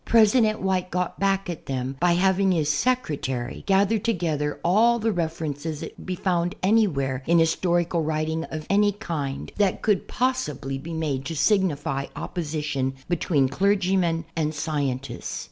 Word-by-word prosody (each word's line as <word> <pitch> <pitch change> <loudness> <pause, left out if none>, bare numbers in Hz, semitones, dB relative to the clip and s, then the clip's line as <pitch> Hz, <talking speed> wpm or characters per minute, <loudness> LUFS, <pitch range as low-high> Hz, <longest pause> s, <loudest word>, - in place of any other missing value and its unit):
President 220 -1 +4
White 185 -1 0
got 180 0 -2
back 195 0 +1
at 175 -3 -6
them 130 0 -3
by 175 0 +4
having 190 +2 +3
his 155 -4 +2
secre 250 - 0
tary 125 0 -3
gather 200 +3 +3
together 165 -9 -1
all 225 +7 +4
the 225 0 0
references 160 -3 -3
that - - -7
could - - -13
be 185 - -1
found 175 -1 0
anywhere 155 - +2
in 170 +1 +4
historical 170 +1 +2
writing 160 +1 -1
of 155 -1 -6
any 205 +1 +3
kind, 155 -9 -4
that 200 -3 +1
could 210 -4 +1
possibly 150 - -1
be 165 +5 -8
made 145 -5 -2
to 165 - -4
signify 145 -8 +1
opposition 150 -5 -3
between 155 -5 +2
clergymen 185 -1 +1
and 155 -1 -1
scientists. 145 -4 -3
170 Hz, 150 wpm, -25 LUFS, 150-195 Hz, -, President